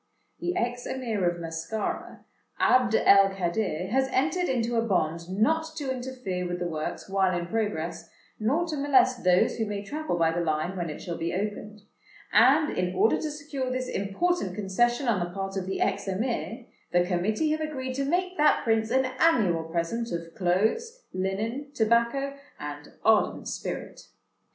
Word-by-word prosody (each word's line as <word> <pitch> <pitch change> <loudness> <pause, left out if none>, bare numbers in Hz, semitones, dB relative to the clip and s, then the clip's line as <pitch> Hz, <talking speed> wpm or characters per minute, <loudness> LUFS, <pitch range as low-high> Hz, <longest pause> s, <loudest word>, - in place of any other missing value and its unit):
"The 355 +1 -2
ex 245 -4 -2
Emir 225 -8 0
of 175 0 -5
Mascara, 165 +6 -4 0.3
Abd 250 -3 +4
el 195 -1 +6
Kadir, 180 -1 -1
has 265 +2 +2
entered 320 +8 +1
into 240 -2 0
a 230 - +3
bond 170 -5 0
not 315 +12 +1
to 285 -4 -3
interfere 245 -8 -4
with 175 0 -3
the 180 - -3
works 155 -3 -4
while 190 -2 +2
in 170 - -3
progress, 175 -5 -3 0.3
nor 275 +11 +1
to 305 - -2
molest 265 -3 +3
those 180 0 +3
who 220 - -1
may 205 -1 -3
travel 300 - -3
by 165 -1 +3
the 175 +1 -1
Line 155 +3 -1
when 175 -3 -3
it 150 - -7
shall 170 -2 -5
be 170 +1 -2
opened; 210 +1 -4 0.5
and, 270 +8 +5
in 180 0 -1
order 210 +5 +4
to 310 - -3
secure 290 -3 -4
this 255 0 -2
important 200 - -1
concession 240 +6 +1
on 220 -5 +2
the 175 0 -3
part 195 +1 -4
of 190 -1 -3
the 190 - -2
ex - - 0
Emir, 230 +4 -2 0.3
the 175 0 +3
Committee 210 - 0
have 310 0 0
agreed 265 -4 -3
to 275 +2 -1
make 360 +5 0
that 300 0 +4
Prince 225 -1 +1
an 260 +2 +3
annual 195 - +3
present 170 +9 -2
of 170 -1 -5
clothes, 220 - 0
linen, 215 +9 -2
tobacco, 235 +5 +2 0.3
and 145 0 -7 0.2
ardent 220 -1 +3
spirit. - - -5
215 Hz, 170 wpm, -27 LUFS, 180-260 Hz, 0.5 s, el